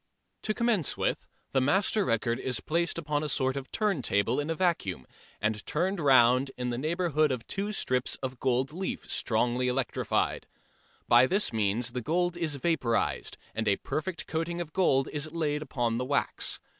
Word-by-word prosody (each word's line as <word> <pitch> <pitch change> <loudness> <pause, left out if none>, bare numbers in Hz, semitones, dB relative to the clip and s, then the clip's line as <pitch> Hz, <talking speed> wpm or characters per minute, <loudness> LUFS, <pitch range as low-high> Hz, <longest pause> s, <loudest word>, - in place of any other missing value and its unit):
To 215 - -1
commence 230 - +1
with, - - -1 0.2
the 135 - +2
master 195 +9 +2
record 115 - 0
is 130 -3 -1
placed 170 +2 -1
upon 150 -2 -1
a 150 - -2
sort 130 -1 +1
of 135 -1 -6
turntable 130 - +1
in 145 +2 -2
a 165 - 0
vacuum 125 - 0 0.3
and 105 0 -1
turned 185 +5 0
round 130 -2 +5
in 125 -1 -2
the 120 - -2
neighbourhood 155 -1 +1
of 125 -3 -3
two 200 +2 -2
strips 130 -10 0
of 130 -2 -6
gold 130 +2 0
leaf 185 +3 -4
strongly 120 +2 +1
electrified. 125 +1 -1 0.6
By 120 +2 +6
this 195 - +1
means 110 +3 +1
the 125 - -2
gold 175 +6 0
is 160 -4 -1
vaporised 135 -7 0 0.2
and 110 -1 -2
a 100 - +4
perfect 165 +1 -4
coating 165 +2 -2
of 165 -3 -5
gold 135 -8 +3
is 150 +1 -2
laid 150 -3 -1
upon 120 -5 -1
the 125 - -2
wax. 140 +2 0
140 Hz, 170 wpm, -29 LUFS, 125-170 Hz, 0.6 s, By